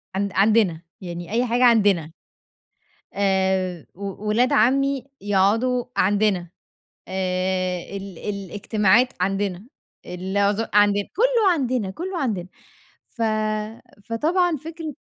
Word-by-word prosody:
عن 200 +1 -1
عندنا 195 -4 +3 0.2
يعني 175 -1 -7
أي 240 +3 +1
حاجة 245 +1 +1
عندنا. 200 -9 +3 1.0
آآ 190 -3 0
و 200 +2 -6
ولاد 240 +4 +2
عمّي 270 +4 +2 0.2
يقعدوا 210 +6 +2
عندنا 195 -2 +2 0.6
آآ 185 -1 -1 0.2
ال 195 -3 -8
الاجتماعات 205 +3 +1
عندنا 195 +1 -1 0.4
العز 200 +4 -1
عندنا 205 -1 +4
كُلّه 460 -3 +3
عندنا 255 - -1
كُلّه 355 - -5
عندنا 205 - -2 0.6
ف 230 - -7 0.8
فطبعا 320 - +1
فكرة 315 +1 -7
205 Hz, 100 wpm, -23 LUFS, 190-245 Hz, 1.0 s, عندنا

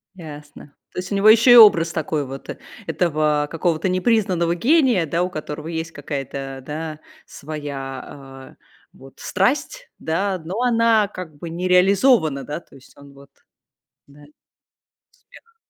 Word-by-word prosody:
Ясно. 150 -3 -12 0.2
То - - -5
есть 185 - -7
у - - 0
него 200 +2 +3
ещё 230 +3 +6
и - - +9
образ 170 -7 +7
такой 155 -2 -2
вот, 135 +1 -9 0.4
этого 155 -2 0
какого-то 170 +1 -1
непризнанного 185 -3 +1
гения, 250 - +3
да, 170 +4 -1
у 180 - -2
которого 150 -1 -7
есть 160 -1 -4
какая-то, 135 -2 -6
да, 155 0 -6 0.3
своя, 135 -2 -8
э, - - -38 0.3
вот 135 0 -17
страсть, 295 - -1
да, 185 +3 -2
но 190 +9 -4
она 230 -4 +3
как 170 -5 -8
бы 165 +2 -8
не 175 +2 -3
реализована, 180 - +3
да, 150 +4 -5
то - - -21
есть 130 - -18
он 140 0 -15
вот 140 0 -17 0.8
Да. 145 +1 -18 0.9
Успех. - - -21
165 Hz, 145 wpm, -21 LUFS, 145-195 Hz, 0.9 s, и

